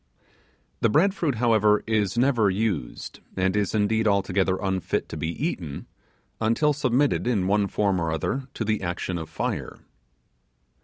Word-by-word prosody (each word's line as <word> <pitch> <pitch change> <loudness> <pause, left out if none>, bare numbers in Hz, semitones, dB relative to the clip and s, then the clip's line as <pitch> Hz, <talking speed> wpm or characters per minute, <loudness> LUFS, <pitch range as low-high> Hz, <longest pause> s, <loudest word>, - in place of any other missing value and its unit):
The 115 - +3
bread 185 - +3
fruit, 160 - -1
however, 110 -3 +3
is 110 -1 0
never 120 -5 +3
used, 95 - -3 0.2
and 95 +1 +1
is 105 -1 0
indeed 110 +1 +2
altogether 95 -2 +1
unfit 95 -3 -1
to - - -6
be 80 - -3
eaten, 85 - -4 0.5
until 115 +7 +2
submitted 140 -1 +1
in 105 -7 +1
one 100 +1 +2
form 100 -3 0
or 80 -1 -1
other 130 - -2
to 115 - -2
the 110 0 0
action 85 0 -3
of 80 -1 -7
fire. 80 - -3
105 Hz, 150 wpm, -25 LUFS, 95-120 Hz, 0.5 s, The